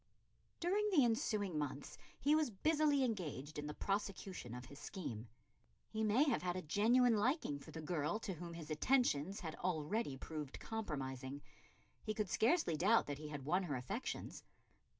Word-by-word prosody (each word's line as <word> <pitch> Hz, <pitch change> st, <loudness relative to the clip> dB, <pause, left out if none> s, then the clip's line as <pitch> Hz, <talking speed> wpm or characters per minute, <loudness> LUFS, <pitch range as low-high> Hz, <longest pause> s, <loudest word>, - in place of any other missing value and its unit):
During 405 Hz, +5 st, +2 dB
the 305 Hz, -10 st, +5 dB
ensuing 210 Hz, -7 st, +1 dB
months 145 Hz, -1 st, -4 dB, 0.2 s
he 290 Hz, -, +4 dB
was 310 Hz, -3 st, +3 dB
busily 295 Hz, +5 st, +3 dB
engaged 155 Hz, -, -2 dB
in 150 Hz, -, -4 dB
the 150 Hz, -, -4 dB
prosecution 195 Hz, -, -3 dB
of 125 Hz, 0 st, -7 dB
his 140 Hz, -, -12 dB
scheme. 120 Hz, -, -5 dB, 0.6 s
He 220 Hz, 0 st, -1 dB
may 220 Hz, +6 st, +5 dB
have 275 Hz, -6 st, +2 dB
had 180 Hz, 0 st, -1 dB
a 185 Hz, -, -3 dB
genuine 230 Hz, +8 st, +4 dB
liking 215 Hz, -, +1 dB
for -, -, -12 dB
the 160 Hz, -, -6 dB
girl 155 Hz, +3 st, 0 dB
to 195 Hz, -, -3 dB
whom 170 Hz, 0 st, -7 dB
his 160 Hz, -2 st, -7 dB
attentions 195 Hz, -, +2 dB
had 160 Hz, -4 st, -4 dB
already 175 Hz, -1 st, -1 dB
proved 150 Hz, -1 st, -6 dB
compromising; 140 Hz, -, -4 dB, 0.6 s
he 215 Hz, -1 st, -3 dB
could 210 Hz, -4 st, -1 dB
scarcely 230 Hz, -, +3 dB
doubt 205 Hz, +9 st, +4 dB
that 145 Hz, -1 st, -4 dB
he 155 Hz, -, -6 dB
had 145 Hz, -3 st, -6 dB
won 180 Hz, +6 st, +3 dB
her 160 Hz, -7 st, -2 dB
affections. 195 Hz, -, -4 dB
185 Hz, 170 wpm, -38 LUFS, 150-230 Hz, 0.6 s, the